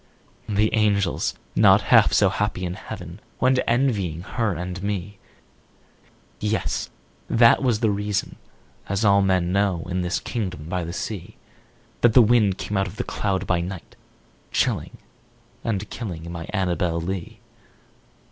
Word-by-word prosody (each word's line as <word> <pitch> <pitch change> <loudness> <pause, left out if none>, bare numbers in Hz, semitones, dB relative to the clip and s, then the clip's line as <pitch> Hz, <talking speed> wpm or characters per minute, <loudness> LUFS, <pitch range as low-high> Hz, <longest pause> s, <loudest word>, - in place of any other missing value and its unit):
The 105 +1 +1
angels, 100 -4 +1 0.2
not - - +6
half - - +7
so - - +4
happy 105 -3 -2
in 90 - -3
heaven, 90 -2 -8 0.2
Went 130 0 +3
envying 105 - +1
her 110 -1 -1
and 90 +2 -5
me 100 0 -4 1.2
Yes! 105 +1 -1 0.4
that 115 0 +5
was 120 -5 +1
the 110 -3 +3
reason 105 0 -2 0.5
(as 100 +3 0
all 100 0 +5
men 95 -2 +1
know, 95 -3 +1
In 90 0 -1
this 90 0 -1
kingdom 90 -9 -4
by 90 0 -2
the 85 - -5
sea) 100 0 -5 0.7
That 120 -2 +5
the 125 - +8
wind 105 -4 +3
came 105 - -3
out 95 0 +1
of 95 - -9
the 125 - -2
cloud 95 -2 -2
by 90 -2 +1
night, 90 0 -7 0.6
Chilling - - -1 0.7
and 105 -3 -2
killing 85 -7 -6
my 85 -1 -6
Annabel 90 -4 0
Lee. 90 +1 -5
100 Hz, 145 wpm, -23 LUFS, 90-105 Hz, 1.2 s, the